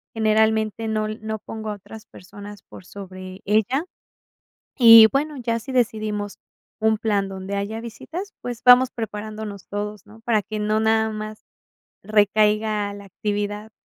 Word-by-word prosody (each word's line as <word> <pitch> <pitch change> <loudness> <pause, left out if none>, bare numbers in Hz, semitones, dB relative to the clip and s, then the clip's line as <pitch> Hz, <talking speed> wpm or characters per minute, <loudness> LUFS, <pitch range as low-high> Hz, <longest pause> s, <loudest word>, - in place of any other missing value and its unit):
generalmente 220 0 +1
no 215 -1 -1
l 215 0 -5
no 220 0 -4
pongo 220 +1 -7
a 210 - -3
otras 215 +2 -13
personas 205 +2 -12
por - - -13
sobre 185 -1 -10
ella. 220 - +1 0.9
Y 230 -3 +10
bueno, 295 +2 -1
ya 230 -2 -1
si 265 +4 -8
decidimos 215 -4 -1 0.4
un 220 0 +2
plan 200 -3 0
donde 190 +1 -5
haya 210 +3 -3
visitas, 330 - -7
pues, 245 -2 -6
vamos 250 +1 +7
preparándonos 215 -3 -6
todos, 205 -1 -5
¿no? 220 +2 -16
Para 230 -3 +1
que 215 -1 -5
no 215 +1 +1
nada 220 0 +2
más 215 0 -7 0.6
recaiga 210 0 +2
la 200 - -10
actividad, 205 +2 -4
215 Hz, 145 wpm, -22 LUFS, 205-225 Hz, 0.9 s, Y